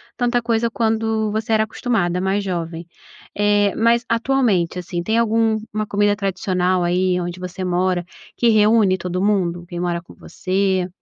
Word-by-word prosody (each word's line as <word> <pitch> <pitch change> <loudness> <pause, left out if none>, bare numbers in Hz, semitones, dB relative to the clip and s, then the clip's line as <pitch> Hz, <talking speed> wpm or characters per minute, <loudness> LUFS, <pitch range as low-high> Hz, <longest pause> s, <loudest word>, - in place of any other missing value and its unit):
tanta 245 -1 +1
coisa 230 0 0
quando 220 -1 0
você 220 +1 -1
era 220 0 +4
acostumada, 205 -5 -1
mais 195 +2 0
jovem. 170 -2 -4 0.5
Eh, 205 -1 +2
mas 235 +1 +3
atualmente, 230 -8 +1
assim, 175 0 -4
tem 220 +5 0
alguma 220 -1 0
comida 205 0 +2
tradicional 185 -2 0
aí 180 +1 +1
onde 175 +1 -5
você 180 +1 -6
mora 180 0 0 0.3
que 235 - +2
reúne 215 -3 +4
todo 180 +1 -3
mundo? 180 -4 0
Quem 175 -1 -6
mora 175 -1 -1
com 170 - -16
você? 190 -1 -1
200 Hz, 155 wpm, -20 LUFS, 180-220 Hz, 0.5 s, era